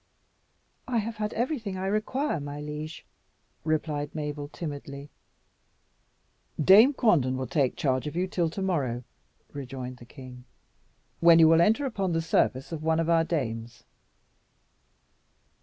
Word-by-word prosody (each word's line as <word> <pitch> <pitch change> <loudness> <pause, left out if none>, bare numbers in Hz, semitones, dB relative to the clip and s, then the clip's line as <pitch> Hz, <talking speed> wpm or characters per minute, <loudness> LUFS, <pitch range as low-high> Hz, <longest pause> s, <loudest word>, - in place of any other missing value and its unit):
"I 250 -2 0
have 220 0 -2
had 210 0 -2
everything 230 -6 -2
I 190 - -3
require, 215 - -1
my 145 0 -6
liege," 150 +2 -7 0.6
replied 150 -2 -2
Mabel 150 -1 -4
timidly. 145 -2 -7 1.5
"Dame 200 - +7
Quanden 155 - +2
will 130 - -3
take 135 +1 0
charge 130 0 0
of 150 - -6
you 180 +2 +1
till 175 -3 0
to 190 +4 -5
morrow," 135 -10 -1 0.5
rejoined 130 -2 -6
the 120 - -13
king, 125 -1 -12 0.7
"when 170 -1 +7
you 165 -1 +7
will 165 +1 +5
enter 220 +10 +3
upon 195 -8 -2
the 165 - +1
service 135 -4 0
of 160 -2 -5
one 160 +1 +1
of 165 0 +1
our 165 -1 +4
dames." 115 -8 -4
155 Hz, 140 wpm, -27 LUFS, 140-190 Hz, 1.5 s, Dame